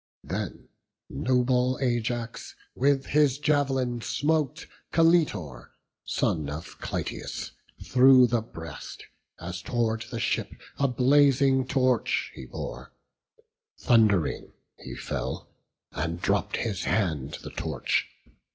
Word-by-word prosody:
Then - - -5 0.4
noble 125 +1 +1
Ajax 120 -2 -2 0.2
with 135 +1 +2
his 145 -3 +3
jav'lin 135 -5 +1
smote 150 +2 0 0.3
Caletor, 155 - +2 0.3
son 75 -3 0
of 75 +3 -8
Clytius, - - -4 0.3
through 130 0 +7
the 120 -1 +1
breast, 80 - -9 0.3
As 90 0 -6
tow'rd 115 0 -1
the 115 - -4
ship - - -1 0.3
a 140 - +3
blazing 135 0 +4
torch 130 -3 +1
he 65 - -9
bore; 65 +1 -7 0.9
Thund'ring 105 - +2 0.3
he - - -8
fell, - - -5 0.4
and 85 +3 -3
dropp'd - - 0
his 105 -5 -2
hand 75 -9 -1
the - - -7
torch. - - -1
125 Hz, 105 wpm, -27 LUFS, 90-135 Hz, 0.9 s, through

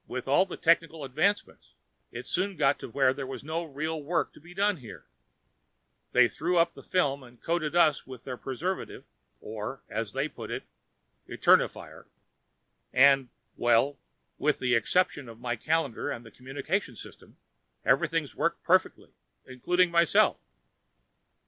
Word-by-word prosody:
With 130 0 -5
all 160 +8 +4
the 185 - -7
technical 165 -2 +2
advancements, 155 +10 -1 0.4
it - - -7
soon 190 0 -1
got 135 +1 +2
to - - -7
where 130 +2 +3
there 135 -1 -6
was 135 - -7
no 160 +3 -3
real 155 +1 -4
work 165 +3 -1
to - - -16
be 175 +3 -14
done 200 0 +2
here; 120 -6 -12 1.1
they 125 -1 +6
threw 175 +8 -1
up 170 0 +3
the - - -12
film 145 -6 0
and 120 -2 -16
coated 165 -1 -1
us 155 -6 +3
with 130 -3 -10
their 130 - -5
preservative 150 +10 -4 0.4
or, 110 +5 -6
as 110 -1 -3
they 135 +2 0
put - - -9
it, - - -4 0.7
Eternifier, - - +2 0.9
and 135 0 +5 0.3
well, 120 +4 +2 0.4
with 150 0 +2
the 125 -1 0
exception 135 - +1
of 115 0 -12
my 120 0 -2
calendar 145 0 -1
and 120 - -5
the 110 - -13
communications 135 - -4
system, - - -13 0.5
everything's - - +1
worked - - -1
perfectly, - - +1 0.3
including 175 +8 +1
myself." 170 -1 +4
140 Hz, 150 wpm, -28 LUFS, 125-170 Hz, 1.1 s, they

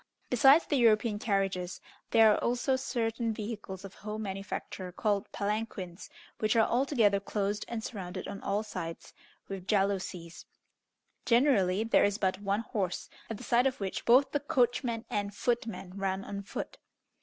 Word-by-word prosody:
Besides 270 +6 +6
the 290 - +1
European 220 -2 +3
carriages, 195 -4 -1 0.3
there 225 -1 +6
are - - 0
also 245 +2 +1
certain 230 -3 -1
vehicles 205 -3 -6
of 195 - -9
home 215 +1 -6
manufacture 195 -1 -5
called 200 +1 -1
palanquins, 200 -3 -3 0.3
which 215 0 +1
are 225 -1 +5
altogether 235 -6 +3
closed 205 0 -2
and 230 -2 -4
surrounded 185 -5 -5
on 200 - -6
all 205 +2 0
sides 170 -6 -6 0.3
with 195 -2 -7
jalousies. 190 -4 -1 0.8
Generally, 220 -6 +3
there 225 - +4
is 205 0 +2
but 190 -1 0
one 200 +1 0
horse, 195 -5 -3 0.2
at 225 - -4
the 250 - -10
side 245 +2 +3
of 265 0 -3
which 195 -2 -3
both 255 +4 +5
the 290 - +1
coachman 245 -4 0
and 205 -1 -2
footman 225 -6 -2
run 195 0 -2
on 200 0 -5
foot. 200 - -6
210 Hz, 155 wpm, -30 LUFS, 195-235 Hz, 0.8 s, Besides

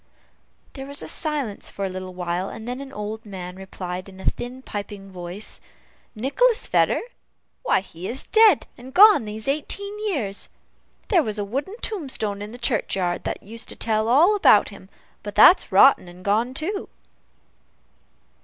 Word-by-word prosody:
There 270 -1 -8
was 280 +1 -7
a - - -7
silence 290 -10 -3
for 200 - -4
a - - -2
little 185 0 -7
while, 180 +1 -2
when 220 +3 -8
an 270 +2 -5
old 215 -2 -6
man 185 -4 -8
replied, 185 -1 -7
in 190 0 -14
a - - -9
thin, 250 +2 -3
piping 200 -2 -7
voice, 180 +3 -7 0.5
"Nicholas 435 - +2
Vedder? - - +2 0.6
why, - - +2
he 185 -1 -9
is 260 +3 -1
dead 435 -7 +5
and 260 +2 -12
gone 415 - +8
these 215 +2 -5
eighteen 400 +9 -3
years! 215 - -1 0.6
There 370 -6 +5
was 215 -7 -3
a 205 - -2
wooden 275 - -4
tombstone 260 - -2
in 210 +1 -7
the 240 - -9
churchyard 200 -7 -1
that - - -4
used 230 +3 -8
to - - -5
tell 220 -1 0
all 320 - +5
about 215 - +5
him, 195 -1 -14 0.3
but 205 -1 -7
that's 360 - +7
rotten 195 0 +6
and 180 +1 -13
gone 225 +6 +1
too." 390 +8 -2
220 Hz, 165 wpm, -23 LUFS, 195-280 Hz, 0.6 s, gone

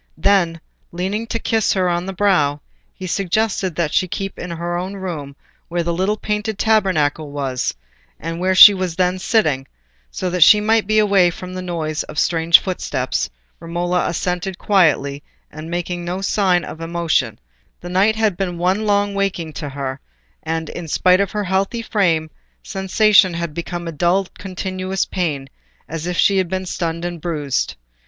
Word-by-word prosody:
Then, 175 -5 +2 0.3
leaning 195 +6 -3
to 230 - -2
kiss 225 -1 +1
her 185 -2 +1
on 175 +1 -1
the - - -2
brow, 165 -7 +2 0.3
he 185 - -9
suggested 195 0 -1
that 165 -2 -1
she - - +3
should - - -13
keep 195 +2 -5
in 180 - -5
her 170 +1 -3
own 185 +3 -4
room 160 -8 -6 0.3
where 170 0 -1
the 170 0 -1
little 190 +5 0
painted 210 0 -2
tabernacle 170 -9 +1
was, 135 -3 -2 0.4
and 165 +1 -5
where 185 +1 +1
she 205 +2 +11
was 185 -3 -3
then 185 +1 +1
sitting, 155 - +1 0.4
so 185 - -4
that 180 0 -2
she 210 +6 +8
might 220 0 +2
be 215 0 +2
away 200 -4 +4
from 185 +2 -8
the 185 - -5
noise 160 -4 -3
of 150 - -9
strange 165 0 +5
footsteps, 185 -2 -2 0.3
Romola 175 +2 -1
assented 180 +2 -2
quietly, 150 -9 +2 0.3
making 175 +3 -4
no 175 +2 -3
sign 195 -2 +1
of 160 - -9
emotion: 165 -8 0 0.4
the 175 - -9
night 195 +4 +3
had 220 -4 +1
been 180 -1 -3
one 190 +5 0
long 205 0 +2
waking 190 -5 -2
to 150 -2 -5
her, 135 -1 -5 0.4
and, 160 0 -3
in 175 -2 -7
spite 180 +4 +3
of 200 - 0
her 210 -1 -1
healthy 195 +5 -1
frame, 165 -8 +1 0.3
sensation 195 -1 +3
had 170 -2 -3
become 175 +1 -5
a - - -3
dull 175 +5 +1
continuous 185 0 -3
pain, 150 -7 -2 0.4
as 165 +1 -5
if 180 -1 -2
she 195 -1 +4
had 185 - 0
been 190 0 -3
stunned 170 -1 -3
and 175 -2 -5
bruised. 150 -5 -2
180 Hz, 175 wpm, -19 LUFS, 165-195 Hz, 0.4 s, she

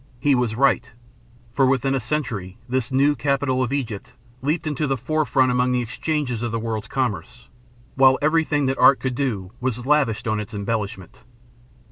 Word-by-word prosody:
He 140 +3 +3
was 120 -4 0
right; 135 -1 +2 0.6
for 135 +1 +3
within 135 +1 +1
a 135 - +1
century 115 -11 -3
this 130 +1 -1
new 140 +3 +3
capital 135 0 0
of 125 -1 -1
Egypt 120 -8 -4 0.3
leaped 155 +5 -1
to 150 +3 -1
the 135 -1 0
forefront 130 -1 +1
among 125 0 +1
the 125 - +1
exchanges 125 0 -2
of 120 -1 -2
the 115 - -1
world's 110 -1 -3
commerce, 125 -1 -3 0.4
while 130 0 +5
everything 155 -1 +1
that 135 0 -1
art 130 +1 +6
could 130 -1 -2
do 115 -8 -2
was 125 -1 -2
lavished 135 -7 +1
on 110 -1 0
its 105 0 -6
embellishment. 100 -3 -4
130 Hz, 170 wpm, -22 LUFS, 115-140 Hz, 0.6 s, art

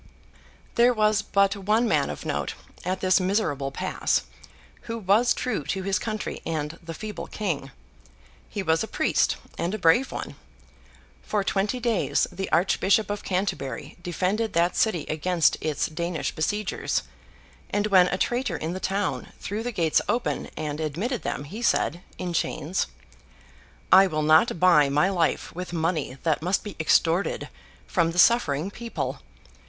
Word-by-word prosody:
There 240 +1 +4
was 215 0 +3
but 200 -1 +2
one 210 +4 +1
man - - +2
of - - -6
note, - - -2 0.3
at 185 +1 -2
this 185 0 +4
miserable 180 -8 0
pass, 135 - 0 0.6
who 230 0 -4
was 215 +4 +3
true 220 -11 -1
to 190 -1 -2
his 195 -1 0
country 215 -2 -4
and 155 0 -3
the 165 -1 -7
feeble 215 -1 -6
King. 165 -10 -3 0.8
He 200 - -3
was 160 0 +2
a - - -4
priest, - - +1 0.2
and 180 +5 -1
a - - -3
brave 190 +8 +3
one. - - -6 0.8
For 210 -2 -1
twenty 205 +5 0
days, 230 -4 +1
the 195 - -5
Archbishop 195 +3 +2
of 205 - -4
Canterbury 180 -7 -3
defended 190 +5 -1
that 170 +1 +2
city 180 -9 +1
against 165 +2 +2
its 155 -3 0
Danish 170 0 -3
besiegers; 205 +6 -1 0.7
and 205 0 0
when 190 -4 +5
a 190 - -1
traitor 240 -6 0
in 160 +3 -3
the 185 - -4
town 195 +1 -2
threw 210 +2 -4
the 245 +1 -3
gates 165 -7 +2
open 240 +1 -1
and 150 -1 -3
admitted 185 - -2
them, - - -3
he 200 +11 -8
said, 175 -7 +1 0.2
in 180 -1 -4
chains, 170 +2 -1 1.0
'I 190 +1 +8
will 155 -3 -1
not 160 +5 +4
buy 160 -6 +5
my 150 +7 +3
life 175 -4 0
with 180 +1 -6
money 160 -5 -1
that 160 -3 +1
must 180 +4 0
be 205 - -7
extorted 165 +3 +2 0.4
from 170 -3 +1
the - - -7
suffering 180 -5 +4
people. 235 +2 -4
185 Hz, 155 wpm, -25 LUFS, 165-210 Hz, 1.0 s, I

